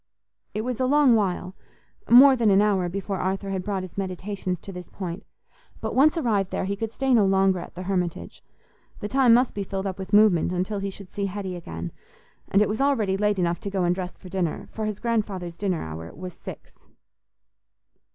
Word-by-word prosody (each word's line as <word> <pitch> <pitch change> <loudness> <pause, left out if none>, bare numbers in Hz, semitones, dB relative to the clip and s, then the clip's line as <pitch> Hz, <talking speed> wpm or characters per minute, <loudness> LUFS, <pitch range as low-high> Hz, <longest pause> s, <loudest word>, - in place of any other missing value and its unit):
It 215 - 0
was 245 +1 -3
a 255 - +2
long 285 -2 +5
while—more 220 +6 +3
than 230 -4 +2
an 195 0 +5
hour 200 -4 +2
before 195 +1 -3
Arthur 195 +1 -2
had 190 -1 -1
brought 195 -2 -2
his 185 +1 -7
meditations 185 -1 -3
to 195 - -8
this 180 -1 -9
point; 180 -2 -6 0.6
but - - -3
once 300 +5 +4
arrived 210 - +1
there, - - -2
he 200 +1 -2
could 220 +2 -4
stay 265 +2 0
no 225 -4 +5
longer 190 -1 +3
at 170 - -10
the 180 - -6
Hermitage. 180 -2 -3 0.6
The 210 - -4
time 260 +1 +4
must 250 +1 +2
be 205 - -3
filled 195 0 -4
up 190 -1 -4
with 190 0 -6
movement 205 -5 +4
until 185 +3 -1
he 195 0 -2
should 195 -1 -11
see 200 -1 -2
Hetty 190 -1 -5
again. 85 - -6 0.6
And 200 +2 +4
it - - 0
was 220 +4 -2
already 230 -9 +2
late 210 0 +1
enough 175 -1 0
to 200 - -5
go 195 -2 -1
and 175 0 +3
dress 180 0 -5
for 185 - -13
dinner, 180 -3 -2
for 220 -1 -3
his 210 -2 -4
grandfather's 205 -7 -2
dinner 185 -2 -1
hour 80 +1 -7
was 180 +2 -7
six. - - -11
195 Hz, 205 wpm, -25 LUFS, 185-215 Hz, 0.6 s, long